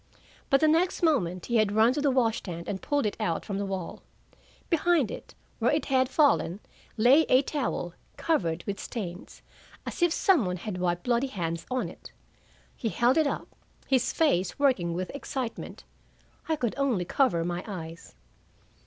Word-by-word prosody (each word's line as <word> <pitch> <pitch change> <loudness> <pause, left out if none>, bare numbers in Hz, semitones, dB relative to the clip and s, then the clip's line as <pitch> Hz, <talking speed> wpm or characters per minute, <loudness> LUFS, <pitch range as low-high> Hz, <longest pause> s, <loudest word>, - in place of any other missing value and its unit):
But 275 - +4
the 310 - +5
next 340 +4 +2
moment 185 - +1
he 235 - +1
had 215 -2 +2
run 220 +3 +4
to 290 - -2
the 285 - +3
wash 235 -4 +2
stand 170 -3 -7
and 190 -2 -3
pulled 290 -4 0
it 205 - -1
out 175 -7 -1
from 200 -1 -3
the 200 - -2
wall. 190 -3 -5 0.7
Behind 330 - +2
it, - - -9 0.2
where 235 +1 +2
it 300 +1 +1
had 260 -2 +2
fallen, 265 - +2 0.4
lay 250 +8 +6
a 255 +2 +5
towel, 255 - -3 0.2
covered 175 - 0
with 200 -1 -4
stains, 185 -6 -7 0.4
as - - -6
if 345 -1 +4
some 370 - +3
one 180 -1 -2
had 180 0 -5
wiped 175 -1 -1
bloody 245 +2 +1
hands 170 -8 -4
on 255 0 -1
it. - - -12 0.6
He 225 - -2
held 240 +4 +2
it 315 -2 +3
up, - - -4 0.4
his 255 -2 +2
face 195 - +1
working 225 -13 +2
with 185 +1 -3
excitement. 265 -4 -5 0.7
I 320 - +3
could 245 -7 -2
only 245 -10 +1
cover 175 -6 +2
my 175 +1 -3
eyes. 165 - -8
230 Hz, 175 wpm, -28 LUFS, 180-275 Hz, 0.7 s, lay